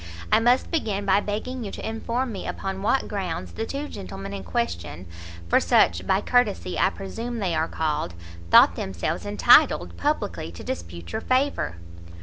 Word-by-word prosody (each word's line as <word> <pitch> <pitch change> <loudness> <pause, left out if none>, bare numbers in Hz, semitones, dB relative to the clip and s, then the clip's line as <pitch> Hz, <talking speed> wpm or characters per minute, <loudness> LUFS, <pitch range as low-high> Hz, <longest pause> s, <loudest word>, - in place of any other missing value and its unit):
I - - +6
must 245 +3 +2
begin 210 - -1
by 195 0 +4
begging 220 +5 -4
you 205 - -4
to - - -5
inform 235 +3 -2
me 195 - -6
upon 195 0 -4
what 260 +6 +1
grounds 185 -6 -4
the 225 - -4
two 285 +2 -4
gentlemen 95 - -7
in 100 -1 -5
question, 85 -2 -3 0.4
for - - +4
such, 90 +2 +3
by 195 - +3
courtesy, 215 -7 +1
I - - +4
presume 230 +5 -6
they 190 -6 -1
are 160 0 +1
called, 150 - -2 0.3
thought - - +7
themselves 95 -3 -3
entitled 85 0 +5
publicly 85 -1 -2
to 85 - -9
dispute 85 0 -6
your - - -3
favour?" 260 - 0
195 Hz, 165 wpm, -25 LUFS, -, 0.4 s, thought